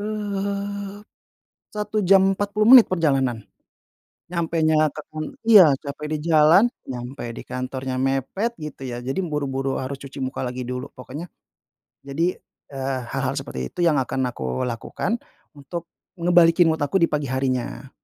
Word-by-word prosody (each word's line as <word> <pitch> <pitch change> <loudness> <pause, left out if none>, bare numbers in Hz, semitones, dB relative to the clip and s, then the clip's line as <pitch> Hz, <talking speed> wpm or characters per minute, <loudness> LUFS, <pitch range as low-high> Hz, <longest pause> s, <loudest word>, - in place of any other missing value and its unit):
eee, 200 -1 -3 0.8
1 210 0 -1
jam 195 0 +5
40 210 +3 +2
menit 250 -4 +10
perjalanan, 135 - 0 0.9
nyampenya 160 -2 +2
ke 155 - -5
kan 155 0 -4 0.2
iya, 195 -11 +8
capek 145 +2 -7
di - - -1
jalan, 155 +5 +6 0.2
nyampe 125 +1 -6
di - - -8
kantornya 130 0 -4
mepet, 135 - -1
gitu, 150 -4 -7
ya, 120 0 -5
jadi 135 +7 -2
buru-buru 140 -6 -2
harus 135 +1 -4
cuci 140 -1 -7
muka 130 - -4
lagi 125 +1 -5
dulu, 125 +1 -5
pokoknya 140 +7 -8 0.8
jadi, 165 +6 -1 0.3
eee, 135 -1 -3
hal-hal 135 0 -1
seperti 65 - -4
itu - - -22
yang 160 -5 +3
akan 130 -1 -1
aku 65 - -3
lakukan 125 - -2 0.4
untuk 170 +4 -7 0.2
ngembalikin 170 -1 +4
mood 160 - 0
aku 145 +7 +1
di - - +4
pagi 150 -2 -1
harinya. 130 0 -2
150 Hz, 145 wpm, -23 LUFS, 130-180 Hz, 0.9 s, menit